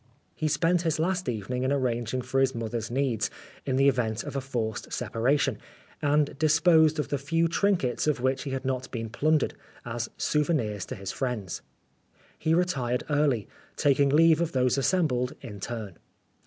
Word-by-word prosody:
He 155 Hz, -, -2 dB
spent 165 Hz, +3 st, +2 dB
his 160 Hz, -3 st, 0 dB
last 180 Hz, -1 st, 0 dB
evening 120 Hz, +2 st, -3 dB
in 130 Hz, +1 st, 0 dB
arranging 125 Hz, -2 st, -1 dB
for 130 Hz, +2 st, 0 dB
his 135 Hz, -1 st, +2 dB
mother's 115 Hz, 0 st, -3 dB
needs 120 Hz, -4 st, 0 dB, 0.4 s
in 130 Hz, -, +1 dB
the 135 Hz, +1 st, +4 dB
event 120 Hz, -4 st, +1 dB
of -, -, -7 dB
a 135 Hz, -, 0 dB
forced 115 Hz, -5 st, -3 dB
separation, 130 Hz, 0 st, 0 dB, 0.4 s
and 145 Hz, 0 st, +2 dB
disposed 160 Hz, 0 st, +4 dB
of 150 Hz, -, -2 dB
the 145 Hz, -, -1 dB
few 165 Hz, +5 st, +1 dB
trinkets 170 Hz, -8 st, +1 dB
of 150 Hz, -4 st, +1 dB
which 130 Hz, +1 st, 0 dB
he 140 Hz, -, -5 dB
had 135 Hz, 0 st, -4 dB
not 130 Hz, -1 st, -2 dB
been 115 Hz, -2 st, -4 dB
plundered, 155 Hz, +4 st, +1 dB, 0.3 s
as -, -, -3 dB
souvenirs 130 Hz, -, 0 dB
to -, -, -5 dB
his 100 Hz, 0 st, -5 dB
friends. 120 Hz, -9 st, -3 dB, 0.8 s
He 160 Hz, +1 st, +2 dB
retired 135 Hz, -9 st, 0 dB
early, 145 Hz, -8 st, +2 dB, 0.3 s
taking 140 Hz, 0 st, +3 dB
leave 160 Hz, +2 st, +5 dB
of 170 Hz, -1 st, -1 dB
those 125 Hz, -1 st, +2 dB
assembled 135 Hz, -4 st, +1 dB
in 105 Hz, -3 st, -8 dB
turn. 105 Hz, -5 st, -6 dB
135 Hz, 170 wpm, -27 LUFS, 120-155 Hz, 0.8 s, leave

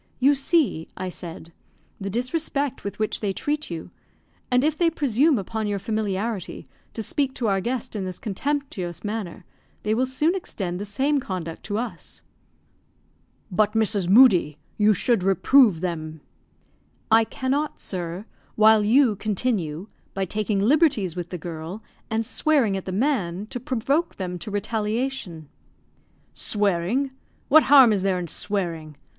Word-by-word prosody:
"You 275 Hz, +3 st, +5 dB
see," 275 Hz, -, +1 dB
I 185 Hz, 0 st, -3 dB
said, 170 Hz, -1 st, -9 dB, 0.5 s
"the 195 Hz, 0 st, -4 dB
disrespect 275 Hz, -, -1 dB
with 200 Hz, -, -5 dB
which 215 Hz, 0 st, -1 dB
they 200 Hz, -3 st, -1 dB
treat 300 Hz, +8 st, -2 dB
you; 165 Hz, -2 st, -6 dB, 0.6 s
and 250 Hz, +1 st, +3 dB
if 305 Hz, 0 st, +2 dB
they 340 Hz, +1 st, +3 dB
presume 285 Hz, -1 st, +2 dB
upon 220 Hz, +2 st, -3 dB
your 205 Hz, -1 st, -1 dB
familiarity, 210 Hz, -1 st, -3 dB, 0.3 s
to 225 Hz, -, -3 dB
speak 275 Hz, +2 st, -1 dB
to 235 Hz, -, -1 dB
our 195 Hz, -2 st, +1 dB
guest 240 Hz, +1 st, -3 dB
in 200 Hz, -, -2 dB
this 185 Hz, -1 st, -5 dB
contemptuous 215 Hz, -, -3 dB
manner, 210 Hz, -4 st, -5 dB, 0.4 s
they 210 Hz, -, +1 dB
will 255 Hz, +4 st, +1 dB
soon 300 Hz, +6 st, +1 dB
extend 190 Hz, -, -4 dB
the 205 Hz, -, -4 dB
same 270 Hz, +8 st, +1 dB
conduct 180 Hz, -8 st, -5 dB
to 205 Hz, -1 st, -2 dB
us." 180 Hz, -, -6 dB, 1.3 s
"But, 210 Hz, +3 st, +2 dB
Mrs. 215 Hz, -5 st, +1 dB
Moodie, 190 Hz, -, +6 dB, 0.2 s
you 210 Hz, 0 st, +4 dB
should 235 Hz, +1 st, +1 dB
reprove 195 Hz, 0 st, +4 dB
them." 160 Hz, -3 st, -4 dB, 0.9 s
"I 225 Hz, +1 st, +7 dB
cannot, 270 Hz, +6 st, -2 dB
sir, 180 Hz, +1 st, -4 dB, 0.3 s
while 220 Hz, 0 st, +6 dB
you 235 Hz, +1 st, +4 dB
continue, 195 Hz, -6 st, -2 dB, 0.3 s
by 195 Hz, 0 st, 0 dB
taking 210 Hz, +1 st, -1 dB
liberties 230 Hz, -, +3 dB
with 175 Hz, -1 st, -5 dB
the 180 Hz, -, -5 dB
girl, 170 Hz, +5 st, -7 dB, 0.3 s
and 225 Hz, +1 st, -1 dB
swearing 265 Hz, -7 st, +2 dB
at 190 Hz, -, -4 dB
the 185 Hz, -, -4 dB
man, 200 Hz, -5 st, 0 dB
to 245 Hz, -, -3 dB
provoke 270 Hz, +7 st, -1 dB
them 180 Hz, -2 st, -5 dB
to 170 Hz, -, -7 dB
retaliation." 210 Hz, -, -3 dB, 0.9 s
"Swearing! 205 Hz, +6 st, +1 dB, 0.4 s
What 315 Hz, +3 st, +8 dB
harm 265 Hz, -6 st, +8 dB
is 200 Hz, -, 0 dB
there 190 Hz, -1 st, +1 dB
in 175 Hz, -1 st, -4 dB
swearing? 165 Hz, -5 st, -3 dB
210 Hz, 150 wpm, -24 LUFS, 185-260 Hz, 1.3 s, What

